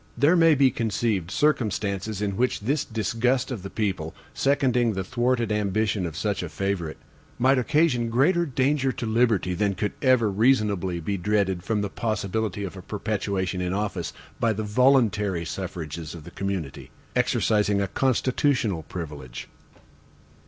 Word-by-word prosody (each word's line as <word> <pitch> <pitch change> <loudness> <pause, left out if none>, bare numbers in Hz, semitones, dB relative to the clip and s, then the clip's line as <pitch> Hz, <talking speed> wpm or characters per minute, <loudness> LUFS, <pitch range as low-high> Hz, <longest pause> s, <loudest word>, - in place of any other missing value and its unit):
There 145 +8 +4
may 165 -2 +6
be 135 -2 +4
conceived 110 -6 -1
circumstances 105 -6 0
in 100 -2 -1
which 125 +1 0
this 140 +8 0
disgust 125 +4 0
of 115 -6 -4
the 95 - -7
people, 95 -8 -2 0.2
seconding 125 -4 +2
the 95 -1 -2
thwarted 120 +1 0
ambition 105 -2 0
of 80 -1 -7
such 100 0 -1
a 90 - -5
favorite, 85 -1 -3 0.4
might 130 +2 +4
occasion 125 -3 +2
greater 165 +9 +3
danger 135 +1 +1
to - - -4
liberty, 110 -5 +2
than 100 +1 0
could 105 +1 -1
ever 125 -5 +4
reasonably 100 -5 +2
be 100 +5 -2
dreaded 95 -1 0
from 105 +1 0
the 100 - -1
possibility 110 -2 -2
of 95 -1 -5
a 95 - -8
perpetuation 100 -2 -2
in 90 0 -1
office, 100 -4 -2 0.3
by 115 -1 +2
the 110 +1 -3
voluntary 105 -6 +2
suffrages 80 -3 -5
of 80 - -10
the - - -11
community, 95 -8 -4 0.3
exercising 105 -2 +2
a 100 - 0
constitutional 125 - +1
privilege. 75 -6 -7
105 Hz, 150 wpm, -25 LUFS, 95-125 Hz, 0.4 s, may